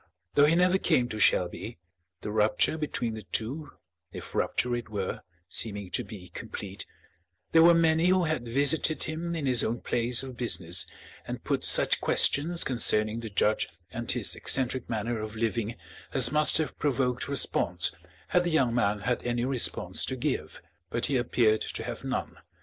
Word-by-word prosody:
Though 145 - +5
he 160 - +3
never 180 +2 +3
came 125 -10 +1
to 110 - -5
Shelby 90 +3 +1 0.4
the 105 - -5
rupture 110 +7 +2
between 145 -7 -3
the 110 - -7
two, 120 - -4 0.4
if - - -9
rupture 125 0 0
it 120 -3 -6
were, 100 -3 -4 0.3
seeming 100 -1 -1
to 125 - 0
be 100 -4 -11
complete 100 0 -7 0.6
there 165 - +6
were 170 +1 +7
many 165 0 +3
who 185 0 +3
had 155 -7 -2
visited 140 +4 +2
him 170 +2 -4
in 155 -4 -3
his 125 -4 +2
own 115 +2 -2
place 120 +1 0
of 130 -2 -8
business 90 -7 0 0.4
and - - -6
put - - -1
such - - +2
questions 165 +4 +3
concerning 110 -3 +2
the 115 -1 -6
judge 105 +1 +1 0.2
and 120 +4 -6
his 120 -4 +1
eccentric 130 -2 +1
manner 115 0 -2
of 110 0 -6
living 115 0 -2 0.4
as 125 -3 +5
must 150 0 +5
have 155 -1 -3
provoked 130 -4 0
response 140 -2 +1 0.4
had 180 - +3
the 175 - -1
young 135 -8 +2
man 105 -4 0
had 120 +4 -1
any 120 0 -1
response 130 -2 0
to - - -3
give. - - -3 0.3
But 120 - -1
he 140 - -1
appeared 115 -3 +2
to - - -5
have - - -6
none. - - -4
120 Hz, 170 wpm, -28 LUFS, 110-150 Hz, 0.6 s, were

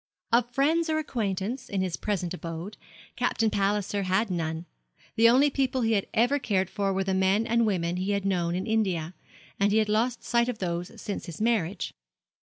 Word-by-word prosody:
Of 240 +1 +3
friends 315 +6 +2
or 310 - +1
acquaintance, 230 -4 -2
in 195 -2 -1
his 180 -3 -2
present 185 -5 -2
abode, 170 +3 -6 0.4
Captain 225 -2 +1
Palliser 200 0 0
had 190 +3 +1
none. 165 -1 -2 0.5
The 230 0 +6
only 275 +4 +5
people 265 -1 0
he 225 -1 +1
had 200 -3 +1
ever 245 +6 +2
cared 190 -7 0
for 200 -2 0
were 195 0 0
the 190 0 -1
men 190 +3 +2
and 230 0 +2
women 175 -3 0
he 185 +2 -2
had 200 -1 -1
known 175 -3 0
in 185 +1 -2
India; 190 -7 0 0.5
and 200 +1 +3
he 215 - +3
had 215 -1 +2
lost 230 +3 +1
sight 235 0 +2
of 245 - -3
those 175 -2 -4
since 200 -1 -5
his 170 - -8
marriage. 210 -5 0
205 Hz, 190 wpm, -27 LUFS, 185-230 Hz, 0.5 s, The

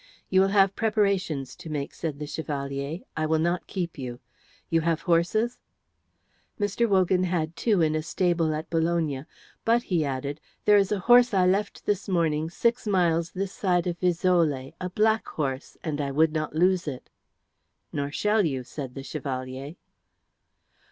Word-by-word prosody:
"You 190 0 +5
will 195 - +4
have 195 -1 +3
preparations 200 - 0
to 180 -2 -10
make," 145 -2 -3
said 155 -4 -4
the 150 - -5
Chevalier. 140 +1 -4
"I 155 0 0
will 160 +1 +2
not 170 +2 0
keep 175 -6 -4
you. 125 -2 -5 0.5
You 165 -1 +2
have 165 0 0
horses?" 185 +7 +1 1.0
Mr. 205 +3 +1
Wogan 185 -1 +3
had 170 -2 -1
two 210 -3 +2
in 155 -1 +2
a 155 - 0
stable 170 0 +1
at 155 +1 -5
Bologna. 160 -4 0 0.4
"But," 235 +1 +3
he 170 -4 0
added, 140 +1 -3 0.2
"there 210 0 +7
is 195 0 +1
a 210 - +2
horse 245 +1 +6
I 185 -1 +4
left 195 +3 0
this 205 0 -1
morning 160 -3 +1
six 235 +6 0
miles 170 -4 +2
this 195 0 -3
side 180 -3 +1
of 175 -1 -3
Fiesole, 170 -7 +1
a 180 - -2
black 220 +4 +2
horse, 135 -3 -4
and 150 -4 -2
I 140 - -2
would 155 +3 +3
not 155 -1 -2
lose 180 +1 +2
it." 130 -4 -6 0.8
"Nor 140 0 -1
shall 210 +6 +2
you," 135 -6 -1
said 130 0 -7
the 135 - -6
Chevalier. 135 0 -5
170 Hz, 165 wpm, -26 LUFS, 150-190 Hz, 1.0 s, there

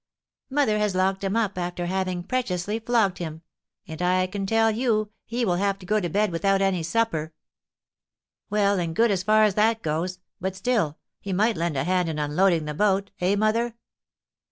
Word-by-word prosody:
"Mother 260 -7 +2
has 210 -3 0
locked 190 +1 +1
him 195 +2 -1
up, 210 -5 0
after 175 0 -3
having 185 -1 -2
preciously 205 -2 -2
flogged 225 -5 +1
him; 160 -1 -6 0.4
and, 160 +1 -7
I 185 +1 +2
can 195 +1 -4
tell 225 +1 +3
you, 215 -2 0 0.2
he 240 +1 -1
will 175 -4 +1
have 200 +1 0
to 185 - -13
go 215 +3 +2
to 175 -4 -2
bed 205 +3 +1
without 195 +3 +1
any 195 -3 +1
supper." 165 -3 -1 1.1
"Well 200 -2 +2
and 165 -2 -3
good 230 +2 +3
as 190 -3 +1
far 215 +3 +4
as 210 -2 +3
that 220 +2 +2
goes; 165 +4 -2 0.2
but 190 +1 -3
still, 195 -7 0 0.2
he 195 - -4
might 220 +5 +2
lend 165 -3 -1
a 135 - +1
hand 180 +1 +1
in 155 - -3
unloading 155 +3 +2
the 150 - -4
boat, 200 +3 +1
eh, 185 +3 +2
mother? 220 +3 +1
195 Hz, 190 wpm, -25 LUFS, 175-215 Hz, 1.1 s, far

